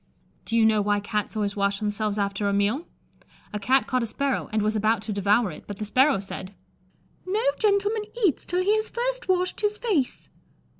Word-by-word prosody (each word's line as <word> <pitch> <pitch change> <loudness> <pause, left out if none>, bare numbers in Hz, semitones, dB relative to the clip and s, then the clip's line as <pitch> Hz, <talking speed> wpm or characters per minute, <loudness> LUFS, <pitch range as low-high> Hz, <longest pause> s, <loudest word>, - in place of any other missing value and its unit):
Do 230 - -2
you 225 - +5
know 215 -1 +4
why 205 0 +1
Cats 210 +1 -3
always 205 -2 -1
wash 200 0 +1
themselves 210 0 -1
after 200 0 0
a - - 0
meal? 210 - 0 0.7
A 210 - -2
Cat 260 +6 +3
caught 255 -1 0
a 230 - -1
sparrow, 280 +3 -2
and 215 -1 +1
was 215 +1 +1
about 215 0 +1
to 220 - -3
devour 205 +1 +2
it, - - -12
but 205 - -6
the 215 - -4
sparrow 260 +3 +3
said, 190 0 -8 0.7
"No 410 +5 -1 0.2
gentleman 415 +1 +2 0.2
eats 325 - +2
till 360 +1 -1
he 410 +3 +3
has 435 0 -1
first - - -2
washed 365 +2 +1
his 420 0 0
face." 375 - -1
220 Hz, 200 wpm, -25 LUFS, -, 0.7 s, you